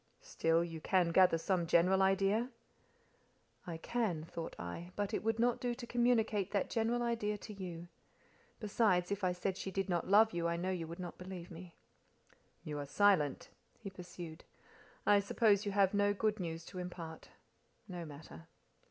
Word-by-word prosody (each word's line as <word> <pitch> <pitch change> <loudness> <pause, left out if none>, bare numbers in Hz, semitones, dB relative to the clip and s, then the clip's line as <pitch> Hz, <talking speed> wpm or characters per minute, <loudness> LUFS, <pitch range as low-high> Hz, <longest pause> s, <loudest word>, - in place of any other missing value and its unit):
"Still, 165 +1 +1
you 165 -2 -6
can 180 -1 +2
gather 180 -1 +5
some 175 0 0
general 180 +4 +4
idea—?" 195 +5 +2 1.2
"I 170 -2 -4
can," 195 -4 -1
thought 165 0 -6
I, 85 - -6
"but 205 +1 -2
it - - -1
would 225 0 +1
not 240 +1 +2
do 245 -1 -1
to 240 0 -7
communicate 225 -5 +2
that 200 -1 -1
general 235 +1 +1
idea 225 -3 -1
to 210 +1 -9
you. 175 -3 -7 0.7
Besides, 200 -4 +2
if 200 0 -2
I 185 - +3
said 180 +1 -2
she 195 - -4
did 195 0 -2
not 175 -2 0
love 220 +3 +6
you, 170 -1 0
I 170 0 0
know 185 +2 -1
you 170 -3 -3
would 170 +1 -7
not 180 -1 -7
believe 180 -1 -8
me." 170 +1 -10 0.9
"You 150 -1 -4
are 145 - -5
silent," 155 -3 +2 0.3
he 205 -4 -8
pursued. 175 -3 -9 0.6
"I 205 0 +6
suppose 205 0 +2
you - - 0
have 195 -1 +3
no 205 0 +2
good 215 +1 0
news 165 -2 -4
to 185 - -8
impart. 170 -3 -7 0.6
No 180 -3 -6
matter. 145 - -11
190 Hz, 175 wpm, -35 LUFS, 170-210 Hz, 1.2 s, love